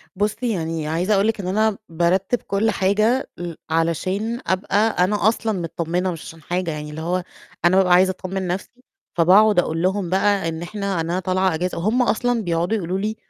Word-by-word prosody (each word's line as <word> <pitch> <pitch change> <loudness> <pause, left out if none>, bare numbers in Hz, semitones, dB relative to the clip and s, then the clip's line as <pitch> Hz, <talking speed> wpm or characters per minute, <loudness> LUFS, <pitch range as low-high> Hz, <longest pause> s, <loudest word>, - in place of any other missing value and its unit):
بُصي 215 +4 -1
يعني 160 -3 -3
عايزة 175 +6 0
أقُول 200 +1 +3
لِك 225 -2 0
إن 180 - -5
أنا 215 +2 +1
بارتّب 180 +7 +1
كل 205 +3 0
حاجة 215 +7 +1
ل 175 -1 -5 0.2
علشان 185 +8 -1
أبقى 190 +2 0 0.3
أنا 210 +2 +1
أصلًا 220 -3 0
متطمنة 170 +2 -2
مش 165 -2 -7
عشان 165 0 -11
حاجة، 175 +1 -2
يعني 150 0 -6
اللي 150 +1 -7
هو 180 +2 -1 0.4
أنا 185 +2 +5
بابقى 180 -2 +4
عايزة 185 +1 +5
أطمن 185 0 -4
نَفْسي، 195 +7 -5 0.3
فباقعد 195 +4 +6
أقُول 165 -1 -1
لهم 185 -1 0
بقى 195 -1 +2
إن 160 0 -5
إحنا 200 -1 -3
أنا 170 +3 -1
طالعة 185 0 +1
إجازة، 180 +3 -2
وهُم 215 +9 +1
أصلًا 245 0 +1
بيقعدوا 175 +4 0
يقُولوا 185 0 -2
لي 215 +2 -2
185 Hz, 185 wpm, -21 LUFS, 170-210 Hz, 0.4 s, فباقعد